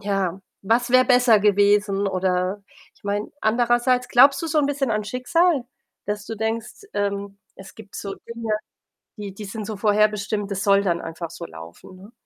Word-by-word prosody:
ja, 195 Hz, -2 st, -2 dB, 0.2 s
was 235 Hz, +5 st, +1 dB
wäre 255 Hz, +1 st, +6 dB
besser 245 Hz, -4 st, +5 dB
gewesen? 205 Hz, 0 st, +3 dB
Oder 185 Hz, +1 st, -1 dB, 0.3 s
ich -, -, -29 dB
meine 205 Hz, +1 st, -2 dB
andererseits, 240 Hz, +2 st, +2 dB
glaubst 270 Hz, +2 st, +6 dB
du -, -, -2 dB
so 315 Hz, -1 st, +1 dB
'n 290 Hz, -, +3 dB
bisschen 280 Hz, -3 st, -1 dB
an 215 Hz, -1 st, -1 dB
Schicksal, 270 Hz, -, +1 dB, 0.4 s
dass 205 Hz, 0 st, -3 dB
du 225 Hz, -, -5 dB
denkst, 225 Hz, -, -4 dB
ähm: 200 Hz, 0 st, -3 dB, 0.2 s
„Es 190 Hz, 0 st, -13 dB
gibt 215 Hz, -3 st, -14 dB
so 195 Hz, -1 st, -5 dB
Dinge, 230 Hz, -1 st, -6 dB, 0.6 s
die 205 Hz, -3 st, -7 dB
die 210 Hz, -, -8 dB
sind 210 Hz, +1 st, -6 dB
so 215 Hz, -1 st, -5 dB
vorherbestimmt, 210 Hz, 0 st, +1 dB
das 195 Hz, -1 st, -2 dB
soll 200 Hz, 0 st, +4 dB
dann 175 Hz, -4 st, 0 dB
einfach 165 Hz, 0 st, -6 dB
so -, -, -8 dB
laufen, 80 Hz, -, -12 dB
ne?“ 195 Hz, +4 st, -15 dB
210 Hz, 175 wpm, -23 LUFS, 195-240 Hz, 0.6 s, wäre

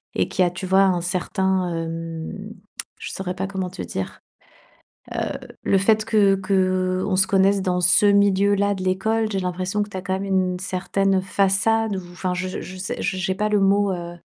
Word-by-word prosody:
et -, -, +1 dB
qui 185 Hz, -, -2 dB
a, 175 Hz, -, +3 dB
tu 180 Hz, +2 st, -7 dB
vois, 190 Hz, +1 st, +4 dB
un 185 Hz, -3 st, +2 dB
certain, 185 Hz, +1 st, 0 dB
hem 165 Hz, +5 st, -5 dB, 0.4 s
je -, -, -7 dB
saurais 185 Hz, -1 st, -4 dB
pas 190 Hz, -, -2 dB
comment 190 Hz, -1 st, -3 dB
te 135 Hz, -, -8 dB
dire. 95 Hz, +2 st, -5 dB, 0.9 s
Heu, -, -, -2 dB, 0.2 s
le -, -, +2 dB
fait 215 Hz, +2 st, +3 dB
que 210 Hz, -3 st, +4 dB
qu'on 185 Hz, 0 st, 0 dB
se 190 Hz, +1 st, +4 dB
connaisse 195 Hz, +1 st, +3 dB
dans 180 Hz, -1 st, 0 dB
ce 180 Hz, +4 st, +5 dB
milieu 200 Hz, 0 st, +4 dB
là 200 Hz, 0 st, +1 dB
de 190 Hz, -, -6 dB
l'école, 220 Hz, +4 st, 0 dB
j'ai 195 Hz, -2 st, -1 dB
l'impression 185 Hz, +3 st, -2 dB
que 205 Hz, -, -5 dB
tu 190 Hz, -, -7 dB
as -, -, -3 dB
quand 190 Hz, 0 st, -2 dB
même 190 Hz, +1 st, -3 dB, 0.3 s
une 180 Hz, -, -4 dB
certaine 190 Hz, +1 st, 0 dB
façade 200 Hz, +3 st, +1 dB
ou 185 Hz, -, -5 dB
enfin 180 Hz, +1 st, -3 dB
je 185 Hz, 0 st, -4 dB
je 185 Hz, -, -9 dB
sais, 190 Hz, -, -4 dB
j'ai 185 Hz, 0 st, -1 dB
pas 210 Hz, +2 st, -1 dB
le 210 Hz, -1 st, +3 dB
mot, 200 Hz, 0 st, +3 dB
heu 175 Hz, -1 st, -6 dB
190 Hz, 195 wpm, -22 LUFS, 185-200 Hz, 0.9 s, ce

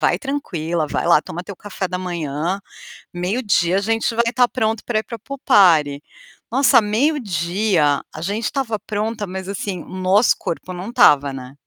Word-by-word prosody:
vai -, -, +2 dB
tranquila, 175 Hz, -, -3 dB
vai -, -, -2 dB
lá 150 Hz, -, +5 dB
toma 175 Hz, +2 st, -7 dB
teu 200 Hz, -, -8 dB
café 200 Hz, -2 st, -5 dB
da 180 Hz, 0 st, -3 dB
manhã. 170 Hz, 0 st, -3 dB, 0.6 s
Meio-dia 185 Hz, -1 st, +1 dB
a -, -, +1 dB
gente 225 Hz, +2 st, 0 dB
vai 235 Hz, -, +2 dB
estar 245 Hz, 0 st, +3 dB
pronto 220 Hz, -2 st, -1 dB
para 220 Hz, -3 st, 0 dB
ir -, -, -5 dB
para 230 Hz, -, -8 dB
pool 275 Hz, +5 st, -8 dB
party". 150 Hz, -7 st, +4 dB, 0.5 s
Nossa, 270 Hz, -4 st, +5 dB
meio-dia, 205 Hz, -, +1 dB
a 155 Hz, -, -8 dB
gente 205 Hz, +6 st, -3 dB
estava 245 Hz, -6 st, -1 dB
pronta, 215 Hz, 0 st, -2 dB
mas 190 Hz, 0 st, -6 dB
assim, 195 Hz, -3 st, -4 dB
o -, -, -17 dB
nosso 185 Hz, +4 st, +3 dB
corpo 180 Hz, +2 st, -5 dB
não 180 Hz, +5 st, -6 dB
estava, 145 Hz, -11 st, +5 dB
né. 130 Hz, 0 st, -9 dB
195 Hz, 175 wpm, -20 LUFS, 170-225 Hz, 0.6 s, lá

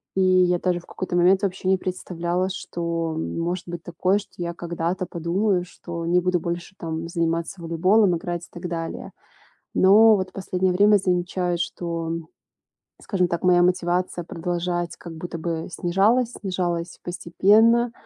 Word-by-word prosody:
И 190 Hz, -, +2 dB
я 185 Hz, -1 st, +4 dB
даже 180 Hz, -1 st, 0 dB
в -, -, -20 dB
какой-то 185 Hz, -1 st, -4 dB
момент 180 Hz, +2 st, +4 dB
вообще 190 Hz, -1 st, -2 dB
не 190 Hz, -, +4 dB
представляла, 180 Hz, 0 st, -2 dB
что 170 Hz, -3 st, -3 dB
может 170 Hz, +2 st, -2 dB
быть 175 Hz, -1 st, -6 dB
такое, 180 Hz, +4 st, +1 dB
что 205 Hz, -, -13 dB
я 170 Hz, -1 st, -3 dB
когда-то 170 Hz, +1 st, -3 dB
подумаю, 180 Hz, +3 st, 0 dB
что 170 Hz, -1 st, -7 dB
не 175 Hz, +2 st, +3 dB
буду 180 Hz, 0 st, +1 dB
больше 170 Hz, +2 st, -5 dB
там 165 Hz, -1 st, -4 dB
заниматься 170 Hz, +2 st, -1 dB
волейболом, 180 Hz, +4 st, +3 dB
играть 175 Hz, 0 st, -4 dB
и -, -, -23 dB
так 175 Hz, 0 st, -6 dB
далее. 165 Hz, -1 st, -5 dB, 0.6 s
Но 215 Hz, +3 st, +7 dB
вот 185 Hz, -1 st, -3 dB
последнее 185 Hz, -1 st, -1 dB
время 205 Hz, +3 st, +5 dB
замечаю, 180 Hz, -1 st, 0 dB
что, 170 Hz, -1 st, -3 dB
м, 165 Hz, -1 st, -4 dB, 0.7 s
скажем 185 Hz, -3 st, 0 dB
так, 170 Hz, +1 st, -2 dB
моя 180 Hz, -1 st, +5 dB
мотивация 180 Hz, 0 st, 0 dB
продолжать 175 Hz, +1 st, -3 dB
как 170 Hz, -, -9 dB
будто 170 Hz, +1 st, -6 dB
бы 165 Hz, 0 st, -3 dB
снижалась, 210 Hz, +9 st, +2 dB
снижалась 175 Hz, -3 st, -3 dB
постепенно, 215 Hz, +7 st, +3 dB
175 Hz, 155 wpm, -24 LUFS, 170-185 Hz, 0.7 s, Но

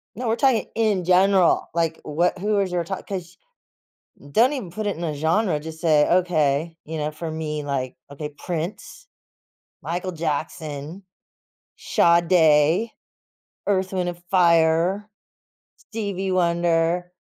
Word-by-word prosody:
No, 245 Hz, +2 st, -4 dB
we're 225 Hz, -, +2 dB
talking 250 Hz, -2 st, +2 dB
in 215 Hz, -5 st, +1 dB
general. 185 Hz, 0 st, +4 dB
Like, 165 Hz, -1 st, -1 dB
what 170 Hz, +5 st, 0 dB
who 205 Hz, +1 st, +1 dB
is 195 Hz, -2 st, 0 dB
your 175 Hz, -1 st, 0 dB
top 190 Hz, +3 st, -6 dB
'cause 180 Hz, -3 st, -6 dB, 0.9 s
don't 240 Hz, -, +4 dB
even 235 Hz, -12 st, -5 dB
put 215 Hz, +3 st, -4 dB
it 200 Hz, -, -2 dB
in 170 Hz, -, -5 dB
a 160 Hz, -3 st, -2 dB
genre. 160 Hz, +4 st, +1 dB
Just 160 Hz, +1 st, -9 dB
say, 155 Hz, -3 st, +3 dB
"Okay," 165 Hz, -3 st, +1 dB
you 160 Hz, +1 st, -5 dB
know, 150 Hz, 0 st, -2 dB
for 160 Hz, +1 st, -6 dB
me, 155 Hz, -1 st, -4 dB
like 135 Hz, -3 st, -3 dB, 0.2 s
okay; 150 Hz, +1 st, -6 dB
Prince, 175 Hz, -, -6 dB, 0.7 s
Michael 180 Hz, +2 st, -3 dB
Jackson, 155 Hz, +1 st, -4 dB, 0.7 s
Sade, 170 Hz, +2 st, +3 dB, 0.8 s
Earth, 190 Hz, -1 st, 0 dB
Wind& 175 Hz, -2 st, -2 dB
Fire, 170 Hz, +2 st, +3 dB, 0.7 s
Stevie 200 Hz, -4 st, -4 dB
Wonder. 170 Hz, 0 st, +1 dB
170 Hz, 130 wpm, -23 LUFS, 160-190 Hz, 0.9 s, general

